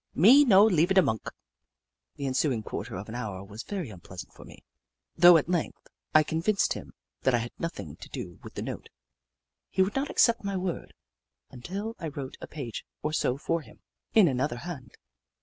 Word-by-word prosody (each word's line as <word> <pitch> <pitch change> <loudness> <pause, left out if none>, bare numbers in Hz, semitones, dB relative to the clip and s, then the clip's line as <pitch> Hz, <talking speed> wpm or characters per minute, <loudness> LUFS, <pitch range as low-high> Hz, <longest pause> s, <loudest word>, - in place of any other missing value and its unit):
Me 245 - +8
no 205 -6 +7
leava 180 -2 +3
da 190 - +8
monk." 110 -6 -1 0.9
The 140 - -5
ensuing 130 -3 0
quarter 110 +1 -5
of 95 +3 -6
an 110 - -8
hour 105 -6 -5
was 105 +3 -8
very 185 - -5
unpleasant 90 -1 -10
for - - -13
me, - - -14 0.5
though 175 0 +9
at 155 - -1
length 175 -3 -1 0.4
I 155 - +8
con 160 +2 -2
vinced 205 +2 +2
him - - -10 0.3
that 130 - +3
I - - +4
had 120 +1 -4
nothing 100 - -5
to - - -11
do - - -7
with - - -11
the - - -4
note. - - -6 0.8
He 190 - +3
would 195 +3 -2
not 275 +1 0
accept 235 -2 +3
my 200 -1 -2
word 180 -2 -4 0.6
until 195 - -5
I 165 - -4
wrote 140 -3 -6
a - - -7
page 130 -7 -6 0.2
or 150 - -1
so 130 -4 +1
for 165 +3 -1
him, - - -17 0.3
in 215 -5 +7
another 130 -2 0
hand. 140 -3 -8
155 Hz, 195 wpm, -28 LUFS, 120-190 Hz, 0.9 s, though